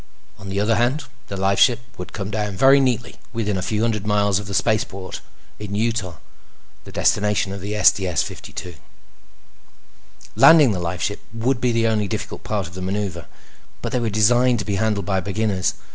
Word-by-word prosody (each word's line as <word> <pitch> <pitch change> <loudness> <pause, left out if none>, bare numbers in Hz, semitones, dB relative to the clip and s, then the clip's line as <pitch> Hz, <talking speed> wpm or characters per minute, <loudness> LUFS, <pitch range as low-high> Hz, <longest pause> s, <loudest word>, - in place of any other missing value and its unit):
On 100 - -9
the 100 +1 -2
other 105 +1 +2
hand, 125 +6 +1 0.2
the 100 - -5
lifeship 100 +5 +3 0.2
would 90 - -8
come 100 +1 -5
down 105 -3 -2
very 135 +5 +6
neatly 125 -3 -1 0.2
within 105 -4 -1
a 95 - -2
few 105 +3 -1
hundred 110 -3 0
miles 100 -2 +2
of 100 - -8
the 100 - -5
spaceport 95 -3 -1 0.4
in 105 -1 -5
Utah, 110 -5 -1 0.7
the - - -10
destination 105 -1 +1
of 100 - -7
the 105 +2 -3
STS 90 -3 +3
52. 90 - -8 1.6
Landing 150 -7 +7
the 95 - -2
lifeship 90 +4 -3
would 120 +3 -1
be 125 0 +2
the 115 0 +1
only 110 -2 +1
difficult - - -5
part 105 -3 -2
of 85 - -10
the 95 - -7
maneuver, 95 -3 -3 0.6
but - - -3
they 125 - 0
were 115 -2 -1
designed 120 +4 +3
to 105 - -4
be 100 -2 -1
handled 105 -1 0
by 95 -2 0
beginners. 100 0 -1
105 Hz, 180 wpm, -21 LUFS, 95-115 Hz, 1.6 s, Landing